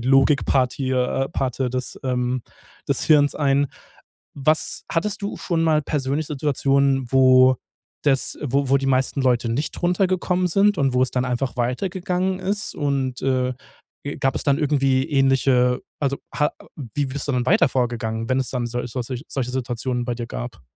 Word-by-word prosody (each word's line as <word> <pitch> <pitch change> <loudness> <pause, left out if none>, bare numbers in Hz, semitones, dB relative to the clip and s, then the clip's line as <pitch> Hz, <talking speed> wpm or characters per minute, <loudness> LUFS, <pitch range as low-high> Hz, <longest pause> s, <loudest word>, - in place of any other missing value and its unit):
Logikpartie, 135 0 +2
äh 130 +1 0
Parte 130 -1 -2
des, 130 0 -4
ähm, 125 -1 -1 0.5
des - - 0
Hirns 145 -2 +4
ein. 140 -1 +2 0.7
Was 155 +3 0
hattest 200 +4 -1
du 200 - -3
schon 165 -3 -1
mal 155 -2 +3
persönlich 145 +1 -2
Situationen, 140 -2 +1
wo 130 -1 +6 0.5
das 135 -2 +1
wo 140 0 0
wo 140 - +6
die 135 - -3
meisten 130 +1 +1
Leute 125 -2 +2
nicht 135 +7 -2
runtergekommen 180 0 +1
sind 200 +2 +3
und 135 -2 +1
wo 125 - +3
es 130 - +1
dann 125 0 0
einfach 125 +1 -2
weitergegangen 185 +8 -1
ist? 200 +2 -2
Und, 135 -3 -2
äh, 130 -1 +1 0.5
äh, 145 - -4
gab 135 - +1
es - - -1
dann 140 0 +2
irgendwie 135 -3 +2
ähnliche, 135 -3 +3 0.2
also 140 -1 0 0.2
ha 150 0 +2
äh, - - -14 0.3
wie 145 -1 0
bist 140 +2 -5
du - - +1
dann 125 0 0
weiter 180 -5 +4
vorgegangen, 115 -3 -2
wenn 130 +1 +2
es 130 - -2
dann 125 -2 -2
solch 120 0 -4
solche 125 -2 -3
solche 130 +3 -5
solche 125 -3 -2
Situationen 125 -1 -2
bei 120 - -1
dir 120 - -5
gab? - - -7
135 Hz, 175 wpm, -22 LUFS, 125-145 Hz, 0.7 s, wo